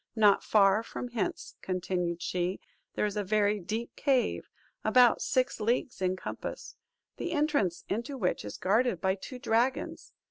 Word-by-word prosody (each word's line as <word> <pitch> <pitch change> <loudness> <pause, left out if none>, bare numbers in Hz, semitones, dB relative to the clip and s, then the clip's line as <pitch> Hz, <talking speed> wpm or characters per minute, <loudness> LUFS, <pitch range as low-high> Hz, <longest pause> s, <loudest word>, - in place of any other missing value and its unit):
Not 210 -3 +5
far 200 0 +4
from 245 +2 -6
hence," 230 -4 -3
continued 180 -2 -2
she, 180 +1 -1 0.4
"there - - +1
is 205 -1 -2
a 210 - 0
very 210 +1 +2
deep 220 +6 -4
cave, 270 -4 +1 0.3
about 250 -2 +5
six 255 -1 0
leagues 235 0 -1
in 185 0 +1
compass; - - -6 0.4
the 345 - -3
entrance 290 - +1
into 235 +7 -3
which 185 -7 -1
is 105 - -7
guarded 215 0 +2
by 190 +2 +1
two 225 +7 -8
dragons. 250 +1 0
215 Hz, 150 wpm, -30 LUFS, 190-245 Hz, 0.4 s, Not